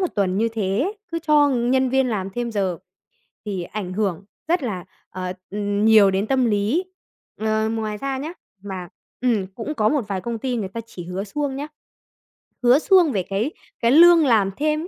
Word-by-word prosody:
1 370 - +2
tuần 190 -2 +1
như 230 +2 +2
thế, 225 - -1 0.2
cứ 335 - 0
cho 300 -1 +5
nhân 260 +1 +2
viên 265 0 +2
làm 195 -4 -2
thêm 240 +3 -3
giờ 190 -5 -1 0.7
thì 195 -4 -3
ảnh 185 0 -5
hưởng 195 -3 -1 0.2
rất 340 -2 +1
là, 190 -7 -4 0.2
ờ, 185 0 -5 0.2
ừm, 205 0 -1
nhiều 215 -3 +7
đến 195 +3 -1
tâm 260 0 +2
lý. 220 - +1 0.6
Ờ, 220 0 0
ngoài 220 -2 -3
ra 270 +4 -3
nhá 295 +5 -5 0.3
mà 190 -3 -6 0.3
ừm, 225 -7 +1
cũng 245 +6 -4
có 215 -7 +2
một 280 -8 0
vài 195 -2 -3
công 235 +2 -3
ty 255 +1 -2
người 215 -5 -2
ta 230 +4 -5
chỉ 185 -6 -9
hứa 180 +2 -4
suông 275 +6 -3
nhá, 285 +2 -4 1.0
hứa 245 +3 +6
suông 360 -2 +4
về 195 -6 -1
cái 200 - -2 0.3
cái 235 - +2
lương 335 +2 +7
làm 215 -6 +3
thêm, 305 +2 0
220 Hz, 195 wpm, -22 LUFS, 200-265 Hz, 1.0 s, nhiều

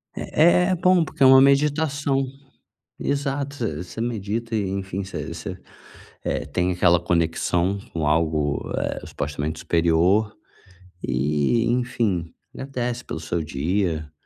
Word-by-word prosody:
É 155 - 0
é 170 - +7 0.2
é - - +2
bom 180 0 +4
porque 155 -2 -1
é - - +8
uma 130 0 +8
meditação. 140 0 +2 0.7
Exato. 140 0 -2
Você 85 -9 -3
você 90 - -8
medita 115 0 -3
e, 100 -3 -1
enfim, 95 0 -3
você 85 -5 -6
você, 90 +3 -6 0.7
eh, - - -2
tem 90 +5 0
aquela 90 -1 +3
conexão 85 +2 0
com 80 -3 -2
algo, 75 -2 0
eh, - - -3
supostamente 75 +2 -4
superior 85 +6 +2 0.7
e, 75 - +1
enfim, 115 -8 -1 0.2
agradece 125 -3 -4
pelo - - -6
seu 85 +1 -2
dia 80 +1 -1
95 Hz, 130 wpm, -23 LUFS, 80-125 Hz, 0.7 s, é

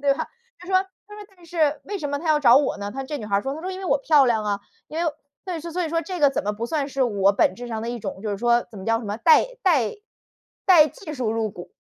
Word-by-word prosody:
对 280 0 +3
吧？ - - -4 0.3
她 360 - -12
说 380 - -1 0.3
她 415 - -11
说： 420 -1 -10
“但 350 - -19
是 310 -4 +1
为 410 -1 -4
什 290 - -3
么 285 0 -2
他 330 - -4
要 305 -1 +4
找 245 -3 +7
我 285 0 +2
呢？” 205 0 -4
她 270 - -4
说 270 - -6
这 295 +1 -4
女 215 - -7
孩 200 -1 +1
儿 200 - 0
说， 270 +1 -3
她 315 - -7
说： 370 - -4
“因 370 - -6
为 - - -6
我 320 - +2
漂 290 -1 +4
亮 225 -3 +1
啊， 205 -1 -1 0.3
因 325 +3 -2
为 320 - 0 0.3
“对，” 355 -4 -4
所 340 +2 -3
以 - - -3
说 330 0 +1
这 365 0 -5
个 285 -2 +6
怎 - - -2
么 210 - 0
不 215 +3 -5
算 285 +1 -1
是 275 -1 -1
我 200 -5 +3
本 195 - +2
质 245 +4 -8
上 220 -1 -4
的 230 - -4
一 240 - -4
种， 195 -2 -6
就 215 - -3
是 200 - -3
说 240 +1 +2
怎 210 - -10
么 190 - -8
叫 225 0 +2
什 235 - -8
么 205 0 -3
带 315 +7 +6 0.2
带 290 - +2 0.7
带 330 -5 +7
技 395 -8 -9
术 250 -5 -1
入 225 -1 -1
股。” 180 -3 -11
275 Hz, 335 characters per minute, -23 LUFS, 220-320 Hz, 0.7 s, 找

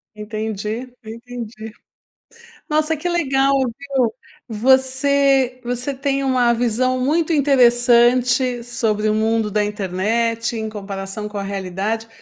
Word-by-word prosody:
Entendi, 215 +3 -5
entendi. 225 -1 -8 1.0
Nossa 310 +1 +1
que 350 +4 -3
legal, 275 -5 +1 0.3
viu, 270 -5 -1 0.4
você 265 +2 +3
você 245 +3 -2
tem 275 0 -1
uma 250 -2 +2
visão 245 +2 0
muito 315 +6 +1
interessante 245 -2 +3
sobre 220 -3 -1
o 215 - +1
mundo 220 -1 0
da 210 0 +1
internet 220 +4 -1
em 220 0 -3
comparação 200 0 -6
com 210 -1 -6
a 200 - -4
realidade. 200 +3 -3
235 Hz, 115 wpm, -20 LUFS, 215-265 Hz, 1.0 s, você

